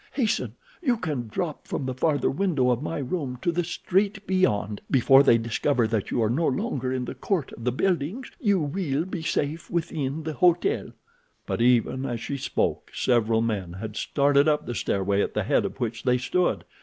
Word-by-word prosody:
Hasten; 245 -6 0 0.3
you 250 -8 +2
can 145 - -3
drop 155 +8 -4
from 140 - -3
the 130 - -2
farther 145 +3 +1
window 145 -6 +1
of 120 +1 0
my 155 - -3
room 135 -2 -3
to 175 - +2
the 175 +1 0
street 195 +4 -1
beyond. 105 - +1
Before 135 +1 +6
they 130 -4 +5
discover 115 +2 +1
that 110 -2 -1
you 120 - +1
are 110 - +1
no 160 +6 +1
longer 130 -1 -1
in 130 -1 -2
the - - -5
court 180 -9 -2
of 115 - -9
the 125 - +2
buildings 185 - -1
you 205 - +2
will 150 -1 -1
be 185 -2 -5
safe 155 0 -2
within 160 -3 -2
the 155 0 -3
hotel." 180 - +2 0.6
But - - -2
even 125 +2 +2
as 120 -2 -3
she 140 +4 -4
spoke, 130 - -1
several 115 -2 +2
men 100 -7 -2
had 105 +3 -6
started 140 +3 +2
up 150 -1 +2
the 120 - -4
stairway 100 -2 0
at - - -2
the - - +1
head - - +2
of - - -5
which 115 -2 -2
they 125 0 +2
stood. 175 +8 0
140 Hz, 195 wpm, -26 LUFS, 120-170 Hz, 0.6 s, Before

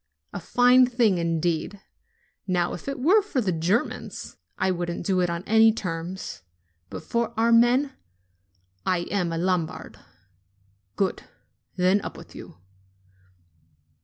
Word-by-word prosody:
A - - -4
fine 250 +1 +4
thing, 230 -7 +2
indeed! 170 +3 -1 0.7
Now 175 -2 0
if 180 - -9
it 275 - -4
were 365 +11 +4
for 400 -10 -3
the 205 -6 0
Germans, 175 +7 -2 0.2
I 190 - +1
wouldn't 175 -1 -4
do 185 0 +1
it 180 -1 +1
on 170 +1 -3
any 220 +2 +5
terms; 180 -3 -5 0.5
but - - -7
for 235 0 -1
our 230 +1 +3
men! 245 +4 +4 0.9
I 180 - 0
am 180 -4 0
a 165 - -2
Lombard 175 -2 -2 0.5
!" 100 +1 -41
"Good! 195 -2 -1 0.5
Then 185 +2 +3
up - - -7
with - - -13
you." - - -11
185 Hz, 135 wpm, -25 LUFS, 170-235 Hz, 0.9 s, any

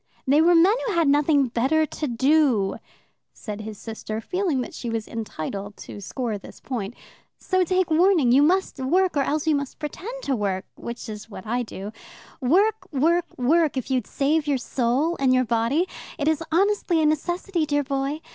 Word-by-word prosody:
"They 285 +4 +4
were 345 +2 +5
men 350 +5 +6
who 430 - 0
had 335 -3 +2
nothing 285 -2 +3
better 270 +7 +2
to 305 0 -4
do," 260 -4 +2 0.6
said 210 -1 -7
his 215 -1 -7
sister, 220 0 -6
feeling 350 - -1
that - - -6
she 240 - -5
was 225 -1 -3
entitled 205 -2 -5
to 205 - -9
score 225 +1 -3
this - - -13
point. 235 -4 -5 0.4
"So 370 -1 +1
take 365 -1 0
warning: 330 -6 +4
you 265 +3 +6
must 355 0 +2
work, 355 +8 +2
or 285 - +3
else 295 +2 -1
you 315 - +3
must 280 -2 -3
pretend 410 - -6
to 275 - 0
work, 195 -4 -2
which 235 0 -7
is 215 0 -8
what 200 -2 -9
I 240 +3 -1
do. 205 -3 -7 0.5
Work, 380 - +2
work, 330 +5 +2
work 300 +3 +2
if 260 +1 -3
you'd 255 -4 0
save 295 +2 0
your 285 -2 +2
soul 260 +7 0
and 260 -2 +3
your 255 0 +3
body. 235 +10 +1 0.3
It 290 -2 -1
is 315 0 +2
honestly 380 -1 +2
a 315 - +3
necessity, 335 +2 0
dear 290 -1 +1
boy. 275 +2 -2
280 Hz, 185 wpm, -24 LUFS, 235-330 Hz, 0.6 s, men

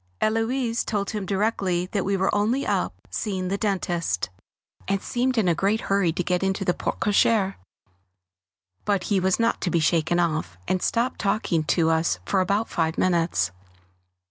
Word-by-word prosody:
Héloise 230 +2 0
told 200 -2 -2
him 210 -3 -4
directly 195 -3 0
that 200 -3 0
we 195 0 0
were 190 +1 +1
only 225 +7 +1
up - - 0 0.2
seeing 190 -4 -2
the 200 - 0
dentist, 175 - -1 0.6
and 195 0 +1
seemed 250 +5 -1
in 215 -5 +3
a 175 - +4
great 200 +6 +1
hurry 195 -4 +1
to 180 - -1
get 180 +1 0
into 195 +1 -1
the 180 - +2
porte - - -3
cocher; 205 -1 +2 1.3
but 200 -3 0
he 195 - +4
was 190 +2 +1
not 230 0 +1
to 180 - 0
be 170 - +2
shaken 170 +1 +2
off, 155 - -1
and 185 - 0
stopped 240 +2 0
talking 195 -6 0
to 165 0 +2
us 160 +1 +1
for 195 - +1
about 200 +4 +1
five 160 -1 -1
minutes. 170 - +1
195 Hz, 170 wpm, -25 LUFS, 175-210 Hz, 1.3 s, a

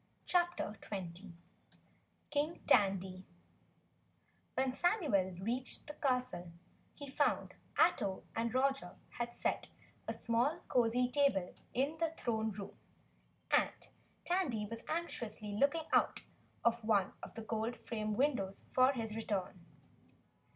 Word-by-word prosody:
CHAPTER 345 - +1
20 185 -1 -5 1.0
King 295 +3 0
Tandy 190 -6 +3 1.3
When 260 -1 +1
Samuel 265 - +2
reached 240 +6 -2
the 295 - -7
castle, 250 - -1 0.4
he 285 - -7
found 285 +2 +1 0.2
Ato 190 -1 +3
and 230 0 0
Roger 265 -6 +1
had 240 0 -4
set - - -1 0.4
a - - 0
small 245 +9 +1
cozy 245 0 +3
table 250 -9 +2 0.2
in 280 +5 +1
the 330 -1 +2
Throne 220 -2 0
Room, 200 0 -7 0.8
and - - +2 0.4
Tandy 290 - +1
was 230 +2 -7
anxiously 265 -10 -2
looking 285 +9 +2
out - - +4 0.4
of 235 0 +3
one 205 -3 +3
of - - -9
the 225 - -5
gold 225 +2 -1
framed 215 -2 -2
windows 235 -9 +1
for 255 +2 +5
his 225 -4 -3
return. 195 -5 -2
235 Hz, 115 wpm, -36 LUFS, 205-280 Hz, 1.3 s, for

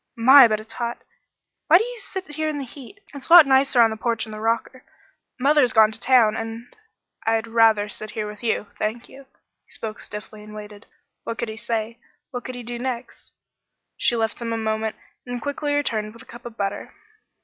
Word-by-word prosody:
"My, 260 +2 +8
but 215 -1 -1
it's 220 +1 -13
hot! 235 -1 -4 0.6
Why 330 - +8
do 400 - +1
you - - -7
sit 380 -5 -7
here 310 +1 -1
in 300 - -3
the 280 - -4
heat? 280 - -13
It's 280 +1 -9
a - - +5
lot 345 -3 +11
nicer 265 -2 +4
on 225 - +3
the - - -3
porch 230 0 -1
in 220 - -11
the 215 - -7
rocker. 230 +3 -2 0.6
Mother's 275 -2 +3
gone 220 -1 +6
to 220 - -10
town 235 -4 +4
and 225 +1 -7 0.2
" - - -30
"I'd 225 0 +1
rather 225 -2 +3
sit 215 +1 -7
here 215 0 -4
with 210 0 -9
you 225 -3 -1
thank 220 +3 -3
you." 275 0 -14 0.4
He - - -40
spoke 215 -1 -7
stiffly 210 0 -9
and 210 0 -11
waited. 210 0 -11 0.4
What 230 - -5
could 235 - -3
he 220 - -6
say; 225 0 -4 0.3
what 245 -2 -5
could 255 - -6
he 245 - -7
do 240 +1 -5
next? 250 -1 -6 0.6
She 240 - +1
left 225 +1 -2
him 230 -1 -3
a 230 - -1
moment 220 0 -2 0.3
and 245 0 -4
quickly 290 +3 -2
returned 220 -7 -1
with 230 - -13
a - - -20
cup 240 +1 -11
of 230 -1 -12
butter. 200 0 -4
230 Hz, 215 wpm, -23 LUFS, 220-260 Hz, 0.6 s, lot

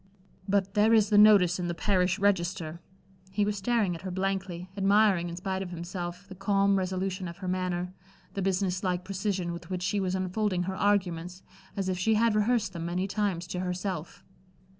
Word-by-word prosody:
"But 195 -1 +1
there 215 +2 +5
is 215 -1 +3
the 205 - +5
notice 195 -4 +6
in 175 - -2
the 170 - -2
parish 185 0 +1
register." 175 -4 0 0.5
He 200 +2 0
was 210 0 -1
staring 210 -2 +1
at 165 - -7
her 190 - -5
blankly, 190 -1 -2
admiring 195 -3 +3
in 170 - -6
spite 190 +1 -3
of 190 - -5
himself, 175 +1 -6
the 195 - -9
calm 195 +1 +2
resolution 185 0 -2
of 170 - -8
her 190 - -6
manner, 180 0 -2 0.4
the 195 - -3
business 185 0 0
like 180 -1 -1
precision 190 -2 -2
with 170 -1 -9
which 180 -1 -3
she 200 +2 0
was 185 -1 -1
unfolding 185 0 0
her 190 +1 -3
arguments, 185 -3 0 0.3
as 195 -1 -1
if 185 -1 -1
she 220 +4 +2
had 230 +1 +3
rehearsed 215 -1 +1
them 170 -1 -4
many 180 +3 -1
times 195 -4 -1
to 180 - -3
herself. 180 -2 -4
190 Hz, 190 wpm, -28 LUFS, 180-200 Hz, 0.5 s, notice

